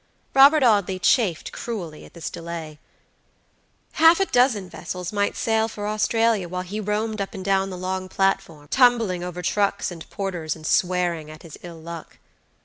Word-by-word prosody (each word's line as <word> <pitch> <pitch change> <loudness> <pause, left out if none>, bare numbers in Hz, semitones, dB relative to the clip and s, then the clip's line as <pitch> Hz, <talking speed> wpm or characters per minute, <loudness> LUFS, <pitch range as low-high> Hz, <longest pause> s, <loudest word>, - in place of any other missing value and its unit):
Robert 280 +2 +7
Audley 200 -5 +3
chafed 185 - +1
cruelly 180 -10 -6
at - - -17
this 170 - -5
delay. 165 -2 -7 1.1
Half 325 +2 +6
a 390 - +3
dozen 245 - +2
vessels 180 +1 -6
might 205 0 0
sail 225 -1 +1
for 210 -2 -6
Australia 215 -2 +1
while 180 +1 -3
he 200 +4 -5
roamed 215 +1 -2
up 200 +3 -5
and 190 -1 -7
down 195 0 +1
the 185 - -6
long 185 +1 -3
platform, 170 -7 -1
tumbling 230 -8 +3
over 180 0 -6
trucks 200 +1 0
and 165 -2 -10
porters, 180 -6 -3
and 155 -1 -12
swearing 175 -3 +1
at 155 0 -12
his 165 -3 -10
ill 170 -2 -10
luck. 165 0 -9
190 Hz, 165 wpm, -23 LUFS, 175-220 Hz, 1.1 s, Robert